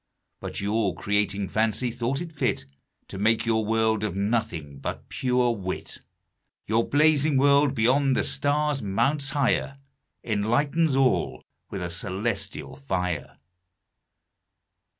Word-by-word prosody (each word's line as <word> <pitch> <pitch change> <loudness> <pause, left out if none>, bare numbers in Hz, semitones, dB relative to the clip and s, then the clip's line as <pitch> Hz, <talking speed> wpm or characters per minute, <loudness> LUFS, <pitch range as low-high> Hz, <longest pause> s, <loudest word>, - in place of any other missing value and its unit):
But - - -5
your 100 -2 0
Creating 100 +1 0
Fancy, 110 +4 0
thought 125 +4 -2
it 170 -2 -6
fit 145 - -1 0.4
To 95 - -7
make 110 +3 +2
your 110 -1 +2
World 110 0 +1
of 105 -4 -2
Nothing, 95 - -2
but - - -5
pure 125 -1 +1
Wit. 95 -5 -4 0.7
Your 115 +2 +1
Blazing 150 -1 +4
World, 140 0 +4
beyond 130 +4 +3
the - - +2
Stars 145 0 0
mounts 140 +9 0
higher, 140 0 0 0.5
Enlightens 130 +9 +1
all 135 -1 +1 0.3
with 95 -3 -4
a - - -2
Cœlestial 100 +3 -3
Fier. 140 -1 -20 0.2
William - - -2
Newcastle. - - -23
115 Hz, 130 wpm, -26 LUFS, 100-140 Hz, 0.7 s, Blazing